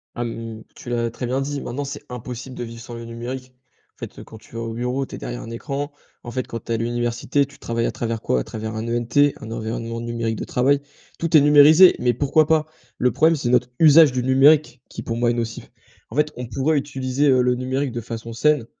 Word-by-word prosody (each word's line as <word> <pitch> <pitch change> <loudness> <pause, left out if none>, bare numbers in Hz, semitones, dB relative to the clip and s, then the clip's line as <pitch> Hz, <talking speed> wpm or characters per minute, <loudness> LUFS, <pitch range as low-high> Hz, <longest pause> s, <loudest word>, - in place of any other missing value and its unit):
Ah, 120 - -2
hem, 115 -1 -6
tu - - -10
l'as 120 -1 0
très 125 - -5
bien 130 +3 -1
dit, 140 +1 -3
maintenant 135 +4 -4
c'est 140 +1 -7
impossible 125 +1 -7
de - - -5
vivre 115 0 -9
sans 120 0 -9
le 115 0 -8
numérique. 125 +2 -7 0.4
En - - -50
fait, - - -8
heu, - - -8
quand 110 - -13
tu - - -20
vas 115 - -3
au 115 -1 -4
bureau, 125 +3 -2
tu - - -8
es - - -7
derrière - - -6
un - - -9
écran, 140 +5 -4 0.3
en 120 - -7
fait, 130 0 -3
quand 115 - -5
tu - - -6
es - - +2
à - - -1
l'université, 120 +4 0
tu 140 -1 -17
travailles 115 0 -2
à - - -2
travers 115 -1 -3
quoi? 65 - +1
À - - -2
travers 110 0 -6
un 110 +1 -4
ENT, 120 +5 +2
un 110 - -8
environnement 115 +1 -4
numérique 115 -1 -2
de - - -5
travail. 140 +3 +2 0.4
Tout 165 -1 0
est 150 - +9
numérisé, 150 +5 +7
mais 125 0 +2
pourquoi 145 +5 +3
pas? 160 -1 +3 0.3
Le 125 -1 +3
problème, 160 +5 +3
c'est 130 -4 -2
notre 125 0 +2
usage 155 -2 +7
du 125 -1 -2
numérique 135 0 +4
qui, - - -7
pour 115 - -4
moi, 120 0 +2
est - - 0
nocif. 115 -1 -5 0.4
En 110 - -10
fait, 150 +1 +2
on 125 - -5
pourrait 135 +5 0
utiliser, 135 0 -1
heu, 130 -1 +4
le 125 0 +2
numérique 130 +2 -2
de 120 0 -4
façon 115 +1 -7
saine 150 +1 +2
125 Hz, 250 wpm, -22 LUFS, 115-140 Hz, 0.4 s, est